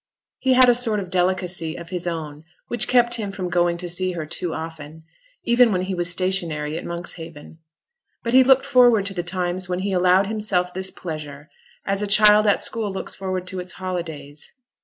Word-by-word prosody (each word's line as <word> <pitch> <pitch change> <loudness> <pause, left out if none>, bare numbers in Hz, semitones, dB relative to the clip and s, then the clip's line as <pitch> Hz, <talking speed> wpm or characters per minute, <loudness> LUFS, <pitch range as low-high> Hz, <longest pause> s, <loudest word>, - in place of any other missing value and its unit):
He 260 -1 +2
had 255 0 +7
a 245 - +6
sort 235 -3 +1
of 185 -3 -7
delicacy 180 -3 -1
of 170 -1 -10
his 180 -1 -3
own 155 -3 -5 0.3
which 240 - +2
kept 240 -1 +3
him 205 -3 -4
from 185 -3 -5
going 175 0 +1
to 175 +1 -5
see 185 +1 -1
her 165 -3 -5
too 170 +2 -4
often, 160 -1 -8 0.4
even 240 -1 +4
when 185 -2 0
he 190 +1 -3
was 175 -1 0
stationary 170 -5 -1
at 165 - -5
Monkshaven; 165 -2 -7 0.6
but 235 - -3
he 260 0 +7
looked 265 +1 +4
forward 245 -6 +4
to 200 - -3
the 180 - -3
times 180 +1 -3
when 180 - -1
he 200 +1 -2
allowed 185 +1 +3
himself 195 -4 -2
this 190 +1 -1
pleasure 155 -4 -8 0.3
as 195 +1 0
a 210 - -1
child 210 +1 +6
at 205 - +3
school 220 -3 -2
looks 190 - -4
forward 185 -1 -4
to 185 0 -6
its 180 +1 -6
holidays. 160 -6 -6
185 Hz, 200 wpm, -22 LUFS, 170-205 Hz, 0.6 s, had